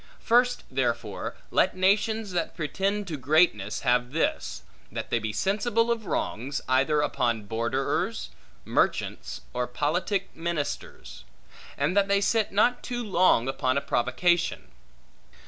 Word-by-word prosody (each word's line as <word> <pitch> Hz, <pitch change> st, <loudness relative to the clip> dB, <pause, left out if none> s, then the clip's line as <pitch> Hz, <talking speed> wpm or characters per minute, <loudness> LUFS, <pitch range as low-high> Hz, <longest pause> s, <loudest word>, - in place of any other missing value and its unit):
First, 245 Hz, +1 st, +3 dB
therefore, 120 Hz, -5 st, -2 dB, 0.2 s
let -, -, +2 dB
nations 210 Hz, +2 st, +2 dB
that 175 Hz, -2 st, -2 dB
pretend 195 Hz, +6 st, -1 dB
to 160 Hz, -4 st, -4 dB
greatness 130 Hz, -, +2 dB
have 125 Hz, +1 st, +1 dB
this; 60 Hz, -, -1 dB, 0.3 s
that -, -, -5 dB
they 120 Hz, -, +2 dB
be 110 Hz, -1 st, -3 dB
sensible 225 Hz, -, +1 dB
of 225 Hz, -3 st, -2 dB
wrongs, 135 Hz, +6 st, -2 dB
either 135 Hz, +4 st, +3 dB
upon 120 Hz, -6 st, 0 dB
borderers, 115 Hz, +5 st, -2 dB, 0.3 s
merchants, 60 Hz, -1 st, -1 dB
or 125 Hz, 0 st, -1 dB
politic 175 Hz, +9 st, -1 dB
ministers; 165 Hz, -3 st, -4 dB, 0.5 s
and 150 Hz, +6 st, 0 dB
that 200 Hz, -1 st, +4 dB
they 200 Hz, 0 st, +3 dB
sit 215 Hz, +2 st, +1 dB
not 230 Hz, +5 st, +3 dB
too 240 Hz, -1 st, -4 dB
long 185 Hz, -, +3 dB
upon 130 Hz, 0 st, 0 dB
a -, -, +1 dB
provocation. 165 Hz, +9 st, 0 dB
155 Hz, 130 wpm, -27 LUFS, 125-200 Hz, 0.5 s, that